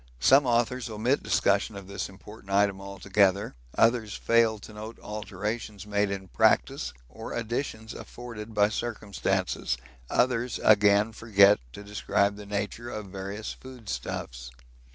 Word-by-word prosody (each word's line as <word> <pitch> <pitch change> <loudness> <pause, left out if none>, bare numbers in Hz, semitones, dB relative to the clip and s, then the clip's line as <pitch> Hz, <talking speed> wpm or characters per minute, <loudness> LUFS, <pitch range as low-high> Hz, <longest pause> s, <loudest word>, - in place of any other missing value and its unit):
Some 135 - +6
authors 120 0 +1
omit 115 +6 +1
discussion 100 +1 +2
of 100 -1 -8
this 100 0 -4
important 100 +1 -12
item 100 -1 +2
altogether, 100 +1 +1 0.2
others 115 -2 +3
fail 115 -1 +3
to 105 +1 -12
note 110 +2 -8
alterations 105 +1 -5
made 105 -1 +1
in 95 -1 -4
practice - - +2 0.2
or 110 - -8
additions 115 -1 -3
afforded 115 -3 -9
by 105 0 +4
circumstances, 105 - -1 0.3
others 125 -1 +1
again 105 0 +5
forget 105 -2 +5
to 100 - -9
describe 100 0 0
the 105 0 -10
nature 105 +3 -3
of 105 -4 -6
various 100 +2 -5
food 125 -5 -11
stuffs. - - -5
105 Hz, 135 wpm, -28 LUFS, 100-115 Hz, 0.3 s, Some